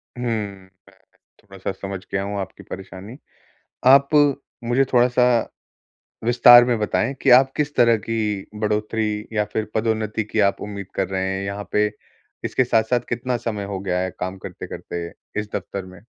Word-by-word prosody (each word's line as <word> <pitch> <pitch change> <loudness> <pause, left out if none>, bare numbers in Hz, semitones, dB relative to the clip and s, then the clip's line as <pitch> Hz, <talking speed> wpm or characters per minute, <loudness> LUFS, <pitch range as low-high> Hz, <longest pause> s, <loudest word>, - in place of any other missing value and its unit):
हुँ, 125 - -6
मैं 100 -5 -3 0.7
थोड़ा-सा 95 -1 -6
समझ 95 -1 -6
गया 95 0 0
हूँ 100 0 -3
आपकी 95 -1 -7
परेशानी। 95 +5 -9 0.7
आप 140 +1 +7 0.6
मुझे 125 +3 +2
थोड़ा-सा 125 0 +4 1.0
विस्तार 120 0 +8
में 120 -2 +1
बताएँ 110 +4 0
कि 135 - +4
आप 135 0 0
किस 150 0 -1
तरह 115 -2 +5
की 105 -3 -2
बढ़ोतरी 105 0 -1
या 105 -1 +1
फिर 110 - -1
पदोन्नति 110 -1 -1
की 110 +1 -1
आप - - -17
उम्मीद 100 -2 -6
कर 95 -2 -1
रहे 95 0 -2
हैं 95 0 -2
यहाँ 100 +1 -4
पे? 105 0 +3 0.6
इसके 130 - +1
साथ-साथ 115 +1 +2
कितना 120 +1 -1
समय 110 -3 -4
हो 100 -1 -4
गया 90 -2 -1
है 95 0 -2
काम 95 +1 -4
करते-करते 85 -1 -6 0.3
इस 105 - -7
दफ़्तर 100 0 -4
में? 90 0 -14
105 Hz, 160 wpm, -22 LUFS, 100-120 Hz, 1.0 s, विस्तार